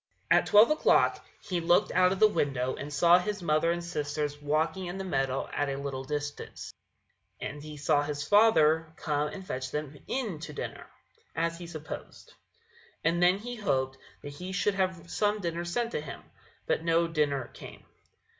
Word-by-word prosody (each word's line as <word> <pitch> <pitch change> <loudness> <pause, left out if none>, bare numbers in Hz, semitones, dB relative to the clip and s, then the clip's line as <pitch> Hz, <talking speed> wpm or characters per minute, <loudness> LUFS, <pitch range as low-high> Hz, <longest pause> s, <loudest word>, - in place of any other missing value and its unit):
At - - +5
twelve 215 +6 +7
o'clock 305 - +3 0.2
he 180 -3 -2
looked 175 +1 +3
out 185 0 +4
of 190 - -2
the 215 - +8
window 135 -9 0
and 145 - -7
saw 170 +5 +5
his 200 +1 -4
mother 155 +1 +2
and 175 0 -2
sisters 150 -3 -3
walking 160 +5 0
in 175 +2 -5
the 195 - -4
meadows 135 -7 -1
at 145 0 0
a 135 - -2
little 140 -1 -4
distance, 145 +1 -5 0.7
and 145 +2 -6
he 150 0 -9
saw 145 0 +2
his 145 0 -3
father 160 -7 +4
come 150 -1 -1
and 190 +5 -8
fetch 130 -5 -4
them 150 -1 -5
in 225 - -2
to 155 -1 -7
dinner, - - -6 0.5
as 165 +1 -1
he 175 - -7
supposed; 155 -2 -9 0.7
and 170 +1 +2
then 180 +2 +5
he 240 +4 -7
hoped 130 -10 -1 0.2
that 145 - -6
he 180 +5 -7
should 200 +2 +1
have 185 -3 -1
some 210 0 +1
dinner 170 -2 -3
sent 230 +7 -2
him; 150 -2 -5 0.4
but - - 0
no 165 0 +3
dinner 145 -5 0
came. - - -11
165 Hz, 175 wpm, -29 LUFS, 145-185 Hz, 0.7 s, the